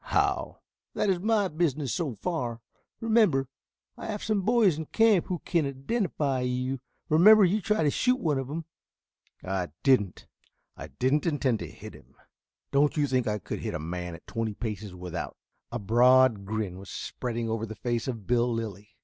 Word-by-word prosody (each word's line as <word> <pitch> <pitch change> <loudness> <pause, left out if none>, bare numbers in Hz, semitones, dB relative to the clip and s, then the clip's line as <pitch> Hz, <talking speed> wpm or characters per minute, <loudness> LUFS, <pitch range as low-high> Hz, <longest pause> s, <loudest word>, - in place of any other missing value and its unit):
"How?" - - 0 0.3
"That 200 - +2
is 180 - 0
my 210 0 +2
business 150 -5 -1
so 155 -10 -2
far. 125 - -3 0.4
Remember 215 - +3 0.5
I - - -7
have 210 -2 -4
some 215 -2 +1
boys 215 -4 +4
in 160 0 -6
camp 225 -6 +3
who 180 -2 -4
can 165 -5 +1
identify 140 - -1
you. 125 +1 -1 0.3
Remember 200 +7 +7
you 205 +4 +1
tried 210 -4 +1
to 145 - +3
shoot 250 - +2
one 150 - 0
of 135 - -4
them." 160 +3 -5 0.8
"I 95 -1 -2 0.2
didn't. 115 -9 +2 0.5
I - - -8
didn't 130 - 0
intend 140 -7 +1
to - - -5
hit - - -11
him. - - -17 0.6
Don't 145 +2 +3
you 145 - +3
think 130 -3 0
I 105 0 0
could - - -6
hit - - -4
a - - -3
man 90 +2 -5
at - - -15
twenty 115 -2 -3
paces 105 -4 -5
without 90 -2 -6 0.2
" - - -50
A 120 - -2
broad 120 0 +4
grin 105 -3 -3
was 95 - -11
spreading 120 -2 -4
over 115 0 -2
the 110 - -7
face 120 0 -2
of 115 -6 -4
Bill 120 +1 +2
Lilly. 110 -2 -5
130 Hz, 185 wpm, -28 LUFS, 110-170 Hz, 0.8 s, Remember